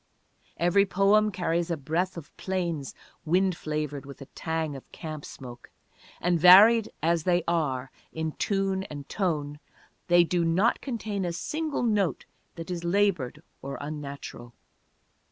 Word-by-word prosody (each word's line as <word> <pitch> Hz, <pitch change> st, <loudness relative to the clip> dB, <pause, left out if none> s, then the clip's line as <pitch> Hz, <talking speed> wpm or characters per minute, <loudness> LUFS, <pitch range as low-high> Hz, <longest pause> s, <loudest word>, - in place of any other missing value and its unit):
Every 175 Hz, +4 st, +3 dB
poem 200 Hz, +3 st, +3 dB
carries 175 Hz, -2 st, -1 dB
a 170 Hz, -, -1 dB
breath 165 Hz, +6 st, -2 dB
of 160 Hz, -, -10 dB
plains, 170 Hz, -7 st, -3 dB, 0.3 s
wind 185 Hz, +3 st, +2 dB
flavored 150 Hz, -3 st, -4 dB
with 140 Hz, 0 st, -11 dB
a 135 Hz, -, -9 dB
tang 160 Hz, -2 st, -3 dB
of 135 Hz, -, -12 dB
camp 155 Hz, -3 st, -7 dB
smoke; 125 Hz, -3 st, -11 dB, 0.5 s
and, 175 Hz, -1 st, +1 dB
varied 210 Hz, +6 st, +8 dB
as 170 Hz, 0 st, +2 dB
they 175 Hz, +1 st, +1 dB
are 135 Hz, -7 st, -1 dB, 0.2 s
in 160 Hz, 0 st, -3 dB
tune 195 Hz, +2 st, -1 dB
and 145 Hz, -4 st, -8 dB
tone, 150 Hz, -7 st, -2 dB, 0.5 s
they 175 Hz, -1 st, +6 dB
do 170 Hz, 0 st, 0 dB
not 180 Hz, +8 st, +2 dB
contain 220 Hz, -6 st, -3 dB
a 175 Hz, -, -1 dB
single 300 Hz, -, -3 dB
note 210 Hz, -7 st, 0 dB, 0.3 s
that 165 Hz, +1 st, -7 dB
is 175 Hz, -1 st, -4 dB
labored 170 Hz, -6 st, 0 dB, 0.2 s
or 140 Hz, 0 st, -5 dB
unnatural. 140 Hz, -5 st, -7 dB
170 Hz, 140 wpm, -27 LUFS, 150-190 Hz, 0.5 s, varied